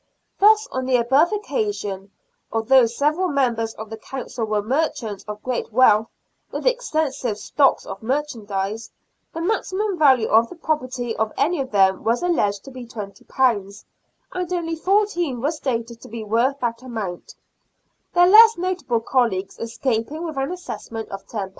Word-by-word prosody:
Thus 430 +2 +6
on 260 - -2
the 260 - +3
above 270 +8 +3
occasion, 405 - -3 0.4
although 235 +2 +4
several 300 +10 0
members 240 -7 0
of 220 0 -9
the 220 - -5
Council 245 -2 -5
were 210 -1 -1
merchants 235 -5 -2
of 210 0 -7
great 250 -2 -3
wealth, 220 -2 +5 0.4
with - - -5
extensive 315 - 0
stocks 275 +5 +2
of - - -7
merchandise, 220 -5 -3 0.4
the 330 - -5
maxi 375 +1 -1
mum 410 -3 -1
value 265 -7 +5
of 225 +1 +4
the - - -10
property 255 -7 -2
of 220 -1 0
any 300 +3 +1
of 265 - -5
them 190 -2 +3
was 230 +7 +1
alleged 205 - +1
to 270 - -11
be 255 -2 -9
£20, 205 -1 -2 0.5
and 365 -1 -3
only 335 -2 -1
fourteen 350 - +1
were 285 +6 0
stated 235 -6 -4
to - - -11
be 225 0 -6
worth 235 +6 +1
that 235 -1 -2
amount, 220 -8 -6 0.8
their 355 0 +6
less 445 +4 +8
notable 345 -10 -1
colleagues 225 -6 0
escaping 230 +5 -2
with 320 -3 -5
an 270 +3 -2
assessment 230 -10 -6
of 195 0 -8
£10. 200 -4 -4
255 Hz, 160 wpm, -22 LUFS, 220-320 Hz, 0.8 s, less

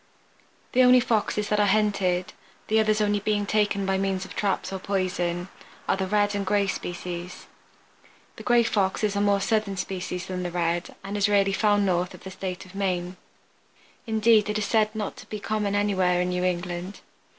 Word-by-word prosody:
The 255 - +4
only 250 0 +7
Foxes 210 -3 0
that 210 - +2
are 205 - +4
hunted 195 -3 +1 0.4
(the 220 +1 +4
others 215 0 +2
only 205 0 +2
being 205 0 0
taken 205 -1 +1
by 190 0 +1
means 190 -1 -1
of - - -11
traps 195 -1 -1
or 190 - -3
poison) 180 -2 -2 0.4
are - - +2
the 190 -1 -2
Red 205 +1 +2
and 200 0 -1
Gray 200 +1 +2
species. 175 -1 -5 0.9
The - - -8
Gray 240 -1 +4
Fox 200 -3 0
is 205 -1 +1
a 200 - +1
more 200 -1 +3
southern 210 -2 0
species 180 -1 -4
than 185 -1 -4
the 180 - -2
Red 175 0 -2
and 195 +1 -5
is 205 +1 +2
rarely 200 -1 +3
found 205 0 +2
north 180 -1 0
of - - -16
the 190 - -8
state 185 0 -5
of 185 - -15
Maine. 185 -2 -2 0.9
Indeed 220 -1 +3
it 210 - 0
is 210 - -1
said 215 -1 +3
to 215 -2 -5
be 215 - -5
not 205 - -13
common 210 -2 -1
anywhere 190 -3 +2
in 180 0 0
New 180 0 -1
England. 180 +1 -3
195 Hz, 195 wpm, -25 LUFS, 185-210 Hz, 0.9 s, only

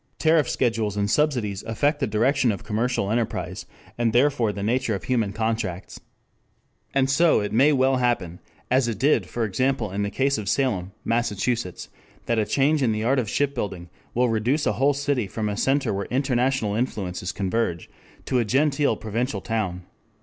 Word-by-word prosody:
Tariff 160 -4 +3
schedules 110 -4 0
and 100 0 +1
subsidies 120 -10 +1
affect 145 +7 0
the 135 - 0
direction 120 +4 +2
of 100 - -5
commercial 110 -2 -1
enterprise, 115 -1 -2 0.3
and 115 -2 +1
therefore 125 -3 +3
the 100 -1 -5
nature 120 0 0
of 95 - -6
human 115 -6 0
contracts. 110 -4 -3 0.9
And 135 -1 +2
so 155 +5 +4
it 105 0 -3
may 135 +7 +5
well 135 -1 +3
happen, 110 -9 -1 0.3
as 130 -1 +3
it 115 -4 -2
did 140 +7 +2
for 120 -1 -2
example 130 +1 0
in 100 +2 -2
the 100 - -1
case 135 +3 0
of 100 -2 -4
Salem, 105 -10 0
Massachusetts, 115 -3 -1 0.4
that 115 -1 +1
a 110 - +1
change 145 +2 +2
in 120 -4 +2
the 110 0 -2
art 130 +3 +2
of 115 -5 -2
shipbuilding 105 -12 -2 0.2
will 125 +1 +3
reduce 120 +7 0
a - - +2
whole 135 +6 +2
city 140 -6 -1
from 105 +2 -3
a 105 - -2
center 135 +2 +1
where 100 0 -3
international 130 -4 0
influences 95 -6 -2
converge 95 -3 -2 0.4
to 130 - +1
a - - +2
genteel 140 +5 +2
provincial 115 +5 -2
town. 100 -6 -3
115 Hz, 175 wpm, -24 LUFS, 105-135 Hz, 0.9 s, may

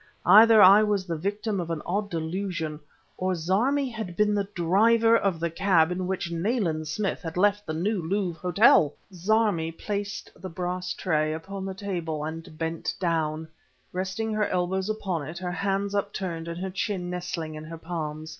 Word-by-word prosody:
Either 220 0 +8
I 195 +3 +9
was 205 -3 +1
the 170 -2 -3
victim 205 +4 -2
of 170 -1 -4
an 165 -2 -3
odd 200 +3 -1
delusion, 165 -2 -3 0.4
or 185 0 0
Zarmi 230 - +1
had 220 -6 -6
been 210 0 +3
the 200 -1 0
driver 225 +7 +4
of 195 -7 +1
the 170 0 -1
cab 175 -2 +3
in 180 0 -2
which 185 -2 -2
Nayland 170 -4 -1
Smith 190 +6 -2
had 165 -2 -6
left 205 +2 +2
the 155 - -2
New 195 +4 0
Louvre 180 0 -2
Hotel! 180 -5 +5 0.2
Zarmi 185 -3 +1
place 200 +3 -4
the 185 - -8
brass 180 +1 -3
tray 155 -4 0
upon 190 +4 -6
the 190 -1 -5
table 170 -6 -3
and 160 0 -7
bent 165 0 -3
down, 160 -3 -1 0.5
resting 190 +4 -2
her 215 -1 +1
elbows 185 +2 -1
upon 185 -9 -2
it, 160 +2 -7
her 180 0 -4
hands 195 +2 -1
upturned 190 -5 -3
and 170 0 -5
her 190 +1 -4
chin 185 -2 -2
nestling 175 -3 -4
in 155 0 -8
her 165 +1 -8
palms. 160 -2 -5
185 Hz, 175 wpm, -26 LUFS, 165-200 Hz, 0.5 s, I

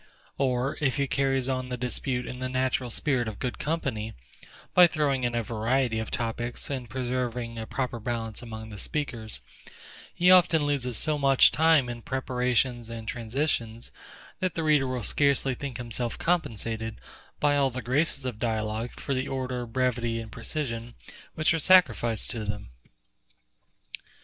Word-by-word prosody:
Or, 130 0 0
if 135 -4 +2
he 140 - +2
carries 135 -1 +1
on 130 -1 -2
the 125 - -3
dispute 125 +1 -2
in 125 - -6
the 130 0 -2
natural 130 -1 0
spirit 125 -1 0
of 110 - -5
good 125 -2 -3
company, 130 -9 -2 0.6
by 180 -1 +9
throwing 145 -5 0
in 120 -1 0
a 115 - 0
variety 115 +2 0
of 110 - -4
topics, 120 +3 -2
and 125 -4 -4
preserving 125 -2 -2
a 110 - -5
proper 125 -3 -2
balance 115 -1 -3
among 110 -2 -7
the 105 -2 -8
speakers, 120 -7 -3 0.7
he 180 +1 +4
often 175 -4 +6
loses 125 -5 0
so 155 -2 +1
much 135 -2 +6
time 160 -4 +4
in 120 -1 -5
preparations 125 -2 0
and 115 -1 -7
transitions, 115 -1 -2 0.5
that 185 -2 -1
the 165 - -1
reader 150 -4 +3
will 125 -2 -3
scarcely 140 +3 +2
think 135 0 -5
himself 120 -1 -3
compensated, 115 -9 -1 0.4
by 145 -1 +3
all 140 -1 +3
the 125 0 -5
graces 140 +2 +1
of 120 -4 -4
dialogue, 110 0 -2
for 140 - -2
the 130 +1 -1
order, 125 -2 -3
brevity, 120 -1 0
and 110 -1 -8
precision, 120 -6 -4 0.4
which 155 +3 +3
are 165 - 0
sacrificed 135 -10 +4
to 115 -4 -3
them. 105 -10 -5
125 Hz, 160 wpm, -27 LUFS, 115-140 Hz, 0.7 s, by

